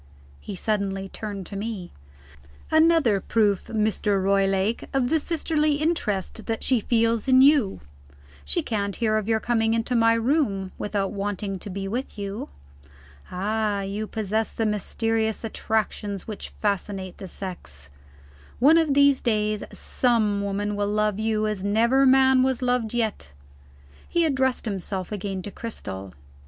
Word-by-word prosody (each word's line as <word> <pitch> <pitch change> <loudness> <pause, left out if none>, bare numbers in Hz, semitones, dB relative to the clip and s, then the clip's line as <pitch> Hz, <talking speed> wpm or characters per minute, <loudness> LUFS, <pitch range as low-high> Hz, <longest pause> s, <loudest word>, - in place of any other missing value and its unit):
He 205 - -7
suddenly 195 -1 -2
turned 200 -3 -6
to 200 - -8
me. 200 -3 -5 0.8
"Another 315 -9 +4
proof, 205 -3 +1
Mr. 215 -2 0
Roylake, 195 +2 +1
of 255 -2 +1
the 320 - +4
sisterly 310 -2 +1
interest 290 - -2
that 225 -1 -2
she 255 -3 +3
feels 230 0 +1
in 260 0 +6
you; 270 - +4 0.6
she 70 0 -1
can't 200 -3 -2
hear 220 -2 +1
of 215 -1 -2
your 225 -1 +2
coming 225 0 +1
to 250 - -2
my 230 0 +4
room, 230 -6 0
without 205 -2 -1
wanting 200 -1 -3
to 205 - -8
be 195 +1 -4
with 245 +5 -4
you. 200 0 -5 0.8
Ah, 205 +2 -1
you 200 +2 -4
possess 220 0 -2
the 225 - -2
mysterious 220 +2 -1
attractions 215 -3 -2
which 215 -2 -6
fascinate 195 -2 -3
the 195 - -7
sex. 70 - -8 0.7
One 305 +7 +6
of 305 -4 +1
these 280 -1 +5
days, 215 -2 0
some 220 -5 +1
woman 205 +1 -2
will 205 0 -1
love 210 -1 0
you 215 -1 0
as 210 -3 -2
never 235 +6 +3
man 265 0 +5
was 260 -1 +1
loved 245 -2 0
yet." 215 - -2 0.8
He 340 -1 +2
addressed 265 -5 +1
himself 190 -2 -3
again 195 -2 -4
to 205 - -6
Cristel. 95 - -6
215 Hz, 145 wpm, -25 LUFS, 200-240 Hz, 0.8 s, in